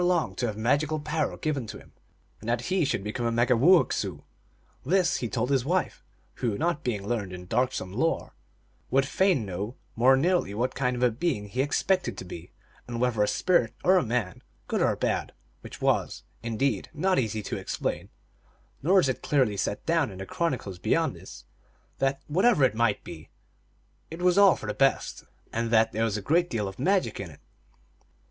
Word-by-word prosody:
erelong 175 - +1
to 120 +5 -2
have 105 -2 -4
magical 145 +7 +1
power 150 +1 -2
given 145 -7 -2
to - - -7
him, - - -16 0.5
and 110 - -6
that 120 0 +1
he 185 -2 +3
should 120 -8 -1
become 115 +3 -2
a - - 0
Megumoowessoo. 120 - +3 0.6
This 175 +5 +2
he 120 - -3
told 125 +4 -1
his 135 -3 +2
wife, 180 +7 -1 0.3
who, 115 -5 -1
not 165 0 -1
being 105 -5 -2
learned 105 -5 -2
in 90 0 -8
darksome 115 -3 -1
lore, 160 +9 -1 0.6
would 135 +1 +3
fain 180 - +2
know 100 +6 -5 0.2
more 130 +3 +5
nearly 170 - +1
what 125 +4 -1
kind 125 -2 0
of 125 - -2
a 125 - +4
being 115 -4 -1
he 125 +6 -1
ex 145 +1 0
pected 190 -1 0
to - - -7
be, 85 0 -9 0.4
and 120 -1 -4
whether 120 -3 +1
a 105 - +3
spirit 125 - +1
or 185 +1 +5
a 180 - +3
man, 115 -7 -2 0.3
good - - -1
or - - +2
bad; - - -1 0.3
which - - -10
was, - - 0 0.2
indeed, 115 -1 -1
not 185 +1 +2
easy 110 -3 -2
to - - -4
explain, - - -3 0.7
nor 185 +7 +4
is - - +1
it 130 - -2
clearly 130 -8 +2
set 100 +1 -2
down 165 -5 +2
in 95 - -10
the 95 - -6
chronicles 125 - -3
beyond - - +1
this, - - -12 0.5
that, 135 0 +1
whatever 185 - +3
it 130 - +4
might 115 +2 +1
be, - - -10 0.8
it 165 - -8
was 180 -1 +4
all 200 -3 +7
for - - -9
the 105 - -2
best, 135 +3 0 0.3
and 115 0 -1
that 115 -1 +4
there 110 - -1
was 110 -2 -1
a 100 - -6
great 170 - +2
deal 105 -4 -2
of 95 +3 -8
magic 190 +7 +1
in 100 -3 -5
it. 75 - -15
125 Hz, 195 wpm, -27 LUFS, 110-155 Hz, 0.8 s, all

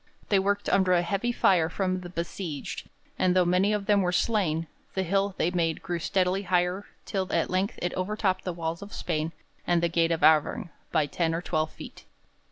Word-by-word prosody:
They 200 - +4
worked 200 +1 0
under 190 -2 +3
a 175 -1 +3
heavy 200 +7 0
fire 180 -8 +3
from 185 +1 -1
the 175 - -8
besieged, 170 -3 -5 0.3
and 185 -1 +3
though 180 -1 +4
many 180 +4 +3
of 210 -1 -1
them 205 -1 +4
were 180 -1 +1
slain, 175 -5 +1 0.3
the 190 - +1
hill 195 +2 0
they 170 - +1
made 165 -3 0
grew 175 -2 -2
steadily 185 +2 +1
higher 180 +1 0 0.2
till 190 -2 -2
at - - +1
length 190 +3 0
it 175 - -1
overtopped 190 0 -1
the 185 - -2
wall 165 -1 -3
of 200 +1 -9
Spain 160 -1 -2 0.4
and 175 -1 +3
the 170 - +3
gate 165 0 +2
of 165 -1 -1
Auvergne 155 +2 +4 0.2
by 155 -3 +3
ten 165 +3 -1
or 165 - -2
twelve 155 -3 0
feet. - - -11
180 Hz, 200 wpm, -27 LUFS, 170-195 Hz, 0.4 s, They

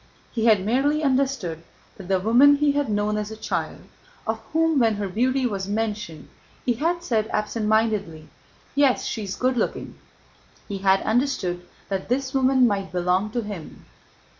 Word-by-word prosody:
He 225 -2 -1
had 210 -4 +4
merely 285 +7 +1
understood 260 - 0 0.3
that 190 - -11
the 190 0 +2
woman 245 +9 +6
he 290 0 +2
had 285 -3 -1
known 210 0 0
as 210 0 -3
a 220 - -8
child, - - -3 0.4
of 220 0 -2
whom 320 -2 +2
when 225 -3 +3
her 205 -1 -3
beauty 255 +7 0
was 195 -5 -2
mentioned 210 -6 -3 0.4
he 245 - +2
had 335 +8 -1
said 220 -8 0
absent 215 0 -2
mindedly: 210 -8 0 0.5
"Yes, 280 -2 +2
she's 205 -4 -4
good 255 0 0
looking," - - -3 0.7
he 200 -2 -4
had 195 0 +3
understood 220 -8 -1 0.2
that 195 0 -3
this 260 +1 -1
woman 260 -1 +4
might 200 -4 -1
belong 180 +3 0
to 235 +2 -2
him. 200 -7 -8
220 Hz, 165 wpm, -24 LUFS, 195-260 Hz, 0.7 s, woman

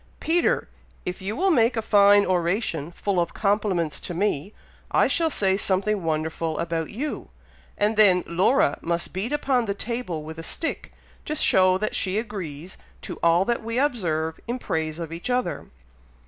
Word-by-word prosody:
Peter! 335 +2 +1 0.4
if 180 +1 -4
you 200 +3 -3
will 380 +7 +2
make 235 -4 +3
a - - +1
fine 205 -1 +5
oration, 175 -3 -1
full 195 +1 -1
of 170 -1 -1
compliments 200 -6 0
to 175 - -4
me, 195 -1 -1 0.4
I - - +3
shall 330 -1 +1
say 195 -9 +1
something 200 +1 0
wonderful 160 0 -2
about 165 -1 -2
you, 285 +8 -5 0.5
and 210 +2 +1
then 190 -4 +5
Laura 175 - +2
must 170 0 -2
beat 195 +8 -3
upon 270 -5 +1
the 200 -2 -2
table 215 -8 -4
with 160 +1 -8
a - - -6
stick, 325 - -4 0.4
to 305 - -1
show 185 -9 +4
that 215 +2 -2
she 190 +1 0
agrees 185 -7 -6 0.2
to - - -7
all 170 +3 +4
that 240 +1 0
we 230 +1 -3
observe 170 - 0
in 240 +2 -2
praise 160 -9 -2
of 165 -1 -6
each 170 +9 -5
other." 250 0 -1
190 Hz, 170 wpm, -24 LUFS, 170-230 Hz, 0.5 s, fine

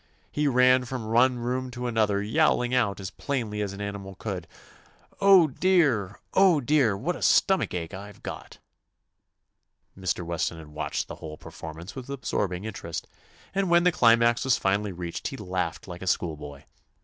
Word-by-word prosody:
He 150 0 0
ran 125 -1 +4
from 120 -3 -5
one 125 +2 +4
room 125 +2 -2
to 125 0 -6
an 120 -2 -3
other 105 -2 +2
yowling 120 +3 +2
out 110 -6 +1
as 95 -1 -6
plainly 110 -4 -3
as 100 -2 -2
an 100 +1 -8
animal 100 -1 -6
could, 95 -4 -5 0.7
"Oh, 195 -3 +7
dear 145 - +2
I 100 - -15 0.2
Oh, 190 -5 +5
dear! 135 -6 +2
What 175 - -2
a - - -9
stomach 190 - +3
ache 85 +1 -4
I 100 +2 -8
've - - -20
got - - -8 1.4
I" - - -15
Mr. 95 -2 -2
Weston 85 0 -2
had 80 -2 -11
watched 75 - -3
the - - -8
whole 75 -1 -8
performance 80 +3 -9
with 130 0 -8
absorbing 100 -9 -2
interest, 95 -6 -6 0.5
and 195 -1 0
when 170 0 +5
the 180 - +5
climax 115 -3 +4
was 130 -2 +3
finally 100 +1 0
reached 85 -1 -5
he 135 - -6
laughed 90 -5 -3
like 90 -1 -8
a 95 - -6
schoolboy. 75 -5 -2
110 Hz, 180 wpm, -26 LUFS, 95-130 Hz, 1.4 s, Oh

